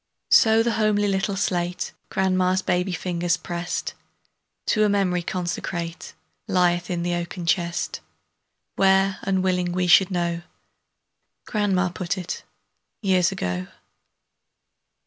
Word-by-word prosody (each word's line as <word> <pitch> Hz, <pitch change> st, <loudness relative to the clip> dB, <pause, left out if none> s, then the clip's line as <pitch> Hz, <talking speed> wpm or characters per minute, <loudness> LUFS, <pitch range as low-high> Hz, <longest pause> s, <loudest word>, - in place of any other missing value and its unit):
So 225 Hz, -1 st, +6 dB
the 235 Hz, -, +1 dB
homely 205 Hz, -1 st, +2 dB
little 195 Hz, 0 st, 0 dB
slate 180 Hz, -2 st, -1 dB, 0.2 s
Grandma's 185 Hz, 0 st, +1 dB
baby's 180 Hz, 0 st, 0 dB
fingers 175 Hz, -1 st, 0 dB
pressed, 175 Hz, +1 st, -4 dB, 0.7 s
To 215 Hz, -, +2 dB
a 210 Hz, -, +3 dB
memory 190 Hz, -3 st, +1 dB
consecrate, 170 Hz, -1 st, -4 dB, 0.3 s
Lieth 180 Hz, -3 st, +2 dB
in 175 Hz, -1 st, -2 dB
the 175 Hz, 0 st, -1 dB
oaken 175 Hz, +1 st, -4 dB
chest, 170 Hz, 0 st, -1 dB, 0.8 s
Where, 195 Hz, 0 st, +3 dB
unwilling 185 Hz, -2 st, 0 dB
we 180 Hz, 0 st, 0 dB
should 180 Hz, +2 st, +6 dB
know, 170 Hz, -2 st, -1 dB, 1.0 s
Grandma 195 Hz, -4 st, +1 dB
put 180 Hz, +2 st, -3 dB
it, 180 Hz, -1 st, -5 dB, 0.6 s
years 185 Hz, -3 st, +3 dB
ago. 90 Hz, +1 st, -3 dB
180 Hz, 110 wpm, -24 LUFS, 175-195 Hz, 1.0 s, So